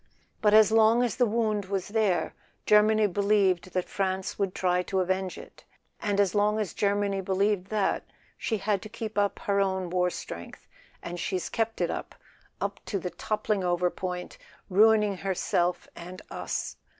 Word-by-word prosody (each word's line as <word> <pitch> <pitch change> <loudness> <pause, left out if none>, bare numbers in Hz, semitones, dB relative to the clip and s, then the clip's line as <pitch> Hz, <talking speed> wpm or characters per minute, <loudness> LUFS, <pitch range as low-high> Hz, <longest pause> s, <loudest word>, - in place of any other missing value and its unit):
But 210 -1 +5
as 220 0 +7
long 225 +2 +5
as 245 - -1
the 245 -2 +3
wound 215 -2 0
was 195 0 -3
there, 205 -6 +1 0.3
Germany 215 +1 +5
believed 200 -2 +2
that 185 -1 -1
France 190 0 -2
would 195 -2 -1
try 180 -1 +1
to 190 +1 -2
avenge 185 0 -1
it, - - -13 0.4
and 205 -1 -1
as 200 -3 +3
long 210 +1 +2
as 210 -4 -2
Germany 200 -1 0
believed 195 0 0
that, 210 -2 0 0.3
she 220 - -2
had 200 -1 0
to 215 - -9
keep 220 0 -6
up 205 -1 +1
her 200 0 0
own 190 -2 0
war 180 0 +2
strength; 85 - -8 0.4
and 175 +1 -5
she's 185 +1 -2
kept 225 0 -2
it - - +1
up - - -6 0.7
to 200 - -1
the 180 -1 -4
toppling 210 +2 -1
over 175 0 +1
point, 180 - -5 0.3
ruining 210 0 +4
herself 180 -2 -1
and 180 +2 -9
us. - - -4
200 Hz, 165 wpm, -27 LUFS, 185-215 Hz, 0.7 s, as